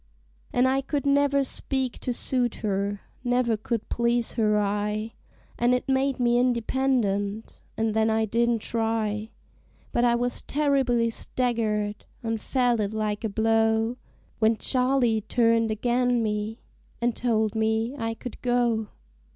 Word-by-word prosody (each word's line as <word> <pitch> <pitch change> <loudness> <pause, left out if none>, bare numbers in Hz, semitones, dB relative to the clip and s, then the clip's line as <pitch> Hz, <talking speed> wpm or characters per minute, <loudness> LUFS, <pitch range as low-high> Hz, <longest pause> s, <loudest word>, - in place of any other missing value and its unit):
An' 245 - +3
I 265 +1 +2
could 280 +1 -3
never 280 0 +3
speak 265 -1 -3
to 250 - -2
suit 245 0 -1
her, 200 0 -1 0.2
never 245 -2 +2
could 220 +1 -3
please 235 0 0
her 215 -2 +2
eye, 210 +2 -1 0.5
An' 240 +1 +3
it 250 - -3
made 270 0 +1
me 240 0 +3
independent, 235 -4 0 0.2
an' 225 0 +1
then 220 +1 +2
I 220 0 +2
didn't 230 +1 +1
try; 220 -2 -1 0.6
But 240 - +1
I 240 -1 +4
was 245 +1 -1
terribly 270 -5 +1
staggered, 220 -4 -2 0.2
an' 225 -1 -1
felt 245 -1 +1
it 210 0 -1
like 215 -1 -2
a 220 - 0
blow, 225 +2 +2 0.4
When 220 0 +3
Charley 250 -4 +2
turned 230 0 +2
ag'in 245 +2 +1
me, 215 +1 -3 0.4
an' 235 0 +1
told 220 -3 0
me 220 +3 0
I 225 -4 -3
could 250 0 -9
go. 240 -3 +1
230 Hz, 140 wpm, -26 LUFS, 220-245 Hz, 0.6 s, I